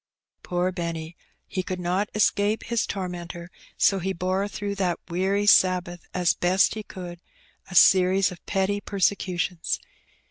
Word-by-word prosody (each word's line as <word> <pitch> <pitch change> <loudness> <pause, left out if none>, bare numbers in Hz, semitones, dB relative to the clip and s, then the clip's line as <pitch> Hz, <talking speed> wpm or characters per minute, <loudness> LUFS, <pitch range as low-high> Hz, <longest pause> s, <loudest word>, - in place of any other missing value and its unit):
" - - -57
Poor 180 +1 +1
Benny! 170 -2 -5 0.3
he 185 - -3
could 185 0 -5
not 180 +4 -1
escape 210 0 +2
his 235 -1 -1
tormentor, 175 -2 -6 0.3
so 195 - +3
he 190 +2 -2
bore 185 +3 -1
throughout 205 0 -5
that 180 -3 0
weary 195 +3 +1
Sabbath, 180 -3 +3
as 180 -2 +2
best 185 +2 +2
he 220 - -5
could, 175 -4 -9 0.5
a 185 - -8
series 185 +2 +5
of 180 - -11
petty 200 +1 0
persecutions. 185 -4 -1
185 Hz, 145 wpm, -25 LUFS, 175-200 Hz, 0.5 s, series